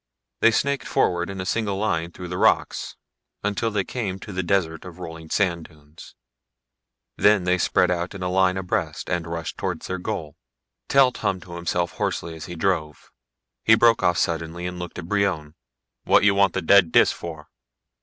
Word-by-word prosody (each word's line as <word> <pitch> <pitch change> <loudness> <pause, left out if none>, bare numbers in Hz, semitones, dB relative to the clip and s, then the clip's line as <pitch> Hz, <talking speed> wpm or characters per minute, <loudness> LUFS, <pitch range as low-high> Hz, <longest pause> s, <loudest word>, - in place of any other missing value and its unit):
They - - +6
snaked 140 +4 0
forward 85 0 +1
in 95 -1 -6
a 95 - -3
single 100 -1 -1
line 85 -5 -1
through 90 0 -8
the 90 - -4
rocks, - - +1 0.5
until 105 +3 0
they 105 -3 0
came 100 -4 -4
to 105 - -8
the 95 - -1
desert 85 -3 0
of 90 -2 -10
rolling 80 -2 -9
sand 85 -4 0
dunes. 75 +1 -16 1.0
Then 105 -2 +4
they 90 0 +1
spread 90 +1 +2
out 90 +2 -2
in 95 - -7
line 90 0 +2
abreast 90 -4 -3
and 85 -1 -1
rushed 85 -1 -5
towards - - -3
their 95 0 -3
goal. 85 -6 -5 0.5
Telt 135 -2 +4
hummed 95 -3 -2
to 85 - -11
himself 85 0 -1
hoarsely 85 - -2
as 80 - -8
he 90 - -7
drove. 80 -4 -2 0.5
He 110 - +6
broke 115 0 +4
off 90 - +2
suddenly 85 +1 -2
and 90 0 -5
looked 90 -1 -7
at 90 - -6
Brion. 95 -7 0 0.5
"What - - +5
you 100 -1 +5
want 100 -2 +3
the 95 - -2
dead 90 -1 +5
Dis - - +5
for?" 80 -3 -8
90 Hz, 185 wpm, -23 LUFS, 85-100 Hz, 1.0 s, They